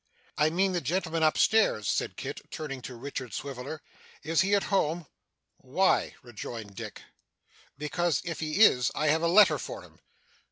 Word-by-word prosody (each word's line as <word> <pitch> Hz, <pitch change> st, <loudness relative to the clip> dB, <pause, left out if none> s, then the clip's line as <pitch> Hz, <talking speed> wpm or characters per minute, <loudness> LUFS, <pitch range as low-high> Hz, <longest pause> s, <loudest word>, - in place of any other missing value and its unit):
'I 150 Hz, +1 st, +4 dB
mean 190 Hz, +4 st, +1 dB
the 175 Hz, -2 st, -1 dB
gentleman 165 Hz, +2 st, -1 dB
up 155 Hz, -1 st, +3 dB
stairs,' 215 Hz, -, +3 dB
said -, -, -1 dB
Kit, -, -, -6 dB
turning 135 Hz, -4 st, -6 dB
to 125 Hz, +1 st, -8 dB
Richard 130 Hz, -2 st, -6 dB
Swiveller. 135 Hz, +2 st, -6 dB, 0.4 s
'Is 165 Hz, +2 st, +2 dB
he 200 Hz, +2 st, +3 dB
at 200 Hz, -, +1 dB
home?' 170 Hz, -2 st, +1 dB, 0.5 s
'Why?' 165 Hz, +9 st, +1 dB
rejoined 115 Hz, -3 st, -8 dB
Dick. -, -, -8 dB, 0.7 s
'Because 160 Hz, +1 st, 0 dB
if 170 Hz, -1 st, -4 dB
he 155 Hz, +5 st, -1 dB
is, 125 Hz, -, +5 dB
I 155 Hz, 0 st, +1 dB
have 160 Hz, +2 st, +3 dB
a 170 Hz, -, +2 dB
letter 205 Hz, +5 st, +6 dB
for -, -, -7 dB
him. -, -, -18 dB
155 Hz, 165 wpm, -28 LUFS, 130-175 Hz, 0.7 s, letter